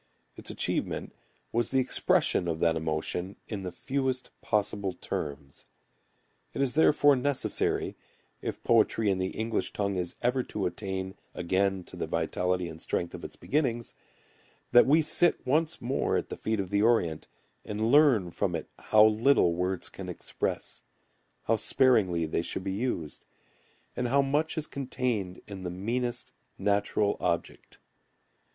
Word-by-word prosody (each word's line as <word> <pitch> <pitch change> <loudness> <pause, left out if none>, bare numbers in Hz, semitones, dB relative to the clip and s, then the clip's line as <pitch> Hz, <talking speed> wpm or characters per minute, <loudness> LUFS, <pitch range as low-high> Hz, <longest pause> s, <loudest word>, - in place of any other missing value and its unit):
Its - - -9
achievement - - -2 0.4
was 120 +1 0
the 135 - +1
expression 125 -7 +2
of 80 -1 -1
that 80 -1 +3
emotion 80 +4 -2
in 105 -3 -4
the 90 -1 -5
fewest 130 +6 -2
possible 100 -2 0
terms. 70 -4 -6 0.9
It - - -1
is 130 -2 +1
therefore 145 -2 +5
necessary, 135 +1 0 0.5
if - - -5
poetry 110 -2 +3
in 95 - -1
the 95 - 0
English 110 +4 -2
tongue 100 -2 -1
is 90 -1 -3
ever 125 +2 +2
to 105 -5 -4
attain 95 +1 -3 0.2
again 95 +2 0
to - - -10
the - - -3
vitality 90 0 -1
and 80 -1 -9
strength 85 - -2
of - - -8
its - - -7
beginnings, 125 -5 -1 0.8
that 120 - +7
we 155 +3 +5
sit 170 +2 +3
once 155 +5 +1
more 130 +3 0
at - - -3
the - - -4
feet 110 -1 -1
of 95 -1 -3
the 100 0 +2
Orient 105 -9 +2 0.4
and 110 +2 -1
learn 130 - +5
from 90 0 -1
it 80 - -4
how 105 0 +5
little 110 -4 +4
words 90 +1 -2
can - - -8
express, - - -4 0.6
how 115 - +2
sparingly 105 -8 +3
they 80 - -1
should 90 - -3
be 95 - -2
used, 100 - -3 0.7
and 125 - -1
how 140 +3 +3
much 150 +4 0
is 155 - 0
contained 125 -10 -3
in 100 -2 -8
the 90 - -4
meanest 120 +7 -2 0.3
natural 100 +1 +1
object. - - -3
105 Hz, 150 wpm, -29 LUFS, 90-125 Hz, 0.9 s, that